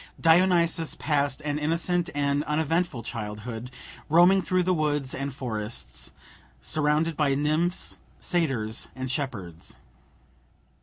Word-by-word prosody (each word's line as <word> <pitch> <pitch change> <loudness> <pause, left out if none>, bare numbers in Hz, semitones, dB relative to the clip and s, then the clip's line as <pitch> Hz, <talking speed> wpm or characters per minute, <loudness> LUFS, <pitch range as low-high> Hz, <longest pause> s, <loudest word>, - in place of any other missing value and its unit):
Dionysus 170 -1 +4
passed 145 -3 0
an 150 0 -2
innocent 170 +3 0
and 145 0 +1
uneventful 160 -3 0
childhood, 110 +2 -5 0.4
roaming 175 +5 +6
through 185 0 +1
the 185 +1 +2
woods 150 -4 0
and 140 +1 -3
forests, 110 - -4 0.5
surrounded 150 - +1
by 140 -2 +2
nymphs, 155 +5 0 0.2
satyrs, 135 - 0
and 130 -1 -4
shepherds. 100 - -5
150 Hz, 105 wpm, -26 LUFS, 125-165 Hz, 0.5 s, roaming